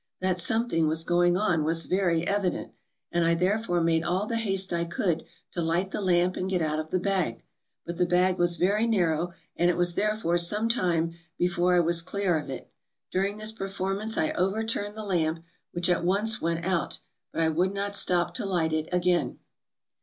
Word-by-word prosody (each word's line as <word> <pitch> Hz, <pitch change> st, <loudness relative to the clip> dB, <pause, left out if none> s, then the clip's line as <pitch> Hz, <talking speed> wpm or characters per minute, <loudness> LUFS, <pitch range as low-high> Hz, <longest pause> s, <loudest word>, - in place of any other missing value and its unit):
That 185 Hz, -1 st, 0 dB
something 200 Hz, -4 st, +1 dB
was 160 Hz, +1 st, 0 dB
going 175 Hz, +1 st, +3 dB
on 175 Hz, -6 st, +1 dB
was 165 Hz, +1 st, 0 dB
very 175 Hz, -3 st, +1 dB
evident, 200 Hz, -2 st, -1 dB, 0.4 s
and 170 Hz, 0 st, +1 dB
I 165 Hz, 0 st, +3 dB
therefore 180 Hz, 0 st, +1 dB
made 165 Hz, 0 st, +2 dB
all 180 Hz, +4 st, 0 dB
the 230 Hz, -, -3 dB
haste 195 Hz, -4 st, -1 dB
I 170 Hz, 0 st, +1 dB
could 170 Hz, -1 st, -1 dB, 0.3 s
to 175 Hz, -, -3 dB
light 170 Hz, +4 st, 0 dB
the -, -, -3 dB
lamp 180 Hz, -1 st, +2 dB
and 185 Hz, -, -2 dB
get 185 Hz, -2 st, +1 dB
out 155 Hz, 0 st, -1 dB
of 155 Hz, 0 st, -5 dB
the 185 Hz, -, 0 dB
bag. 190 Hz, -2 st, -1 dB, 0.4 s
But 170 Hz, 0 st, -5 dB
the 180 Hz, -, +2 dB
bag 180 Hz, +1 st, +2 dB
was 175 Hz, 0 st, +3 dB
very 210 Hz, +5 st, +2 dB
narrow, 175 Hz, -5 st, +1 dB, 0.2 s
and 175 Hz, -, +3 dB
it 175 Hz, -, +1 dB
was 175 Hz, 0 st, +2 dB
therefore 210 Hz, -3 st, +1 dB
some 210 Hz, +6 st, +2 dB
time 170 Hz, -7 st, +1 dB, 0.2 s
before 180 Hz, 0 st, +2 dB
I 175 Hz, -, +5 dB
was 170 Hz, 0 st, +2 dB
clear 180 Hz, -2 st, 0 dB
of 145 Hz, -, -8 dB
it; 135 Hz, -, -7 dB, 0.4 s
during 195 Hz, +2 st, 0 dB
this 215 Hz, 0 st, -1 dB
performance 195 Hz, +1 st, -3 dB
I 155 Hz, -, +1 dB
overturned 205 Hz, +2 st, -1 dB
the 215 Hz, -, -5 dB
lamp, 165 Hz, -4 st, 0 dB, 0.3 s
which 175 Hz, 0 st, -1 dB
at 175 Hz, -1 st, +1 dB
once 205 Hz, +5 st, +1 dB
went 170 Hz, +1 st, -1 dB
out, 185 Hz, -4 st, -1 dB, 0.3 s
but -, -, -2 dB
I 160 Hz, -, +3 dB
would 175 Hz, +4 st, +1 dB
not 200 Hz, 0 st, -3 dB
stop 175 Hz, -2 st, +1 dB
to 180 Hz, -, -2 dB
light 165 Hz, -4 st, 0 dB
it 155 Hz, 0 st, -1 dB
again. 180 Hz, -1 st, +1 dB
180 Hz, 200 wpm, -27 LUFS, 170-195 Hz, 0.4 s, I